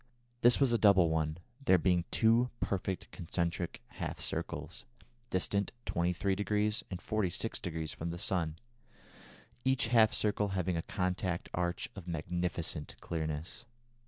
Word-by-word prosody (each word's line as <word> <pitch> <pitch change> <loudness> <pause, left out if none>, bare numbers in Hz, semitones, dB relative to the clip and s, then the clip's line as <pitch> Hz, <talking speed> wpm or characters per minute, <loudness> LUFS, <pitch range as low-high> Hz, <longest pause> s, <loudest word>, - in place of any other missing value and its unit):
This 120 0 +6
was 135 -3 +4
a 115 - +3
double 95 -6 +6
one, 80 -1 0 0.3
there 95 -7 +6
being 90 0 +2
two 115 +2 +4
perfect 95 -2 -2
concentric 85 0 -2
half - - -5
circles, - - -4 0.5
distant 100 +2 0
23° 100 +5 +1
and 90 - -4
46° 90 -6 -2
from 85 - -4
the 85 - -4
sun, 85 -4 0 1.1
each 130 -3 +2
half 115 -2 +6
circle 105 -1 +2
having 90 -1 0
a 85 - 0
contact 90 0 -2
arch 85 0 -1
of 95 -3 -9
magnificent 85 -1 -2
clearness. 80 +6 -4
90 Hz, 125 wpm, -33 LUFS, 85-105 Hz, 1.1 s, This